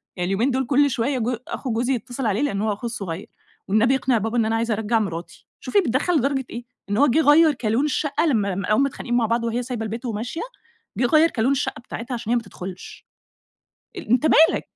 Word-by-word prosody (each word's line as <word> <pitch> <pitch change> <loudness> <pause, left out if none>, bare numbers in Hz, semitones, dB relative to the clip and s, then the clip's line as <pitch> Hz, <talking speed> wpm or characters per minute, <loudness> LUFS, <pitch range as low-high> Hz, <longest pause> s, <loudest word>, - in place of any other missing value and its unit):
يعني 180 - -2
اليومين 220 +8 +1
دول 260 0 0
كل 285 +3 +3
شوية 260 +2 -1
جو 235 +1 -1
أخو 260 - -4
جوزي 240 +4 0
يتصل 245 +2 -4
عليه 215 +2 +1
لإن 205 -9 -1
هو 215 -1 0
أخوه 210 - -8
الصغير، 195 -7 -5 0.4
"والنبي 225 +6 +3
اقنع 260 -2 +1
بابا 225 +3 -2
إن 225 - +3
أنا 225 - 0
عايز 230 +1 -1
أرجَّع 220 +1 +1
مراتي،" 170 -5 -6
شوفي 410 - +1
بيتدخل 325 - +1
لدرجة 270 -1 0
إيه، 240 +1 -7 0.2
إن 205 - 0
هو 285 +4 +5
جه 260 +6 +3
غيَّر 305 +1 +6
كالون 240 +2 0
الشقة 295 +1 0
لما 210 - +1
لاقاهم 210 +6 +1
متخانقين 245 -3 -2
مع 235 - +2
بعض 230 +1 0
وهي 235 +2 -1
سايبة 245 -2 -4
البيت 230 +4 -5
وماشية، 235 +7 -4 0.6
جه 250 - +2
غيَّر 310 +6 +5
كالون 245 +3 0
الشقة 275 - -1
بتاعتها 240 +1 -7
عشان 230 -2 -5
هي - - +3
ما 240 - +1
تدخلش. 185 -2 -9 0.9
أنت 250 -2 +1
مالك؟ 320 +1 +4
240 Hz, 210 wpm, -23 LUFS, 220-270 Hz, 0.9 s, غيَّر